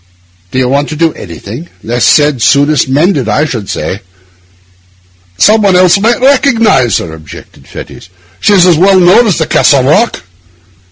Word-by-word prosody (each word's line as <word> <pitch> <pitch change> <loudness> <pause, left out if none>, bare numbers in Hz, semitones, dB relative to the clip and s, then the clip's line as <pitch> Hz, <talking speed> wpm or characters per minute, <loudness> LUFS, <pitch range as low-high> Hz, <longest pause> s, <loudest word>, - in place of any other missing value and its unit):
'Do 130 - -6
you 130 -1 0
want 140 +3 -1
to 155 - -6
do 165 +1 -1
anything? 105 - -10
Least 120 +1 0
said 145 -5 +1
soonest 145 +1 +1
mended, 145 - 0
I 150 +9 0
should 115 -9 -6
say.' 95 - -5 1.4
'Some 215 +1 +3
one 195 -3 +1
else 180 +2 +3
might 230 +4 0
recognise 250 - +1
her,' 80 - -7
objected 80 -2 -14
Fettes. 90 - -12 0.3
'She 205 - +1
was 185 -3 +4
as 175 -3 +3
well 190 +1 +3
known 185 +7 +3
as 195 - 0
the 160 - -1
Castle 140 -3 +2
Rock. 155 - 0
155 Hz, 165 wpm, -9 LUFS, 125-195 Hz, 1.4 s, was